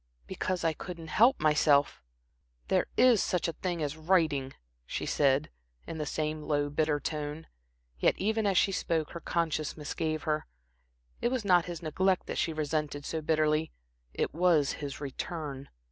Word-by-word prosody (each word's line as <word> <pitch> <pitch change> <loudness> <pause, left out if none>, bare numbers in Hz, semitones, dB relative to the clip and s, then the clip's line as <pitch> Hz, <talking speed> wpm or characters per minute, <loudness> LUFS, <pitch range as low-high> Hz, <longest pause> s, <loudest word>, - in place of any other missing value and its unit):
"Because 180 - -2
I 165 -1 +2
couldn't 165 0 -8
help 235 - +4
myself." 150 -2 +3 0.7
"There - - +2
is 250 -5 +6
such 180 -1 0
a 165 - -2
thing 175 -3 -3
as 145 0 -2
writing," 155 -5 +1 0.3
she - - -3
said, 140 +1 +2 0.3
in 160 - -6
the 150 - -2
same 155 0 -2
low, 145 -1 0
bitter 150 0 +1
tone. 150 +1 -4 0.5
Yet - - +3
even 220 +2 +1
as 195 -2 +2
she 195 - +4
spoke 165 -4 -1
her 170 - -6
conscience 160 -3 -1
misgave 155 +1 -3
her. 155 -1 -1 0.7
It 240 - +2
was 250 -4 -2
not 180 -3 +5
his 175 -2 -6
neglect 185 +4 +1
that - - -3
she 165 - +1
resented 150 -2 -2
so 160 - -3
bitterly, 155 0 +1 0.4
it - - -2
was 165 -4 +3
his 140 -2 -6
return. 140 0 -5
155 Hz, 160 wpm, -30 LUFS, 150-175 Hz, 0.7 s, is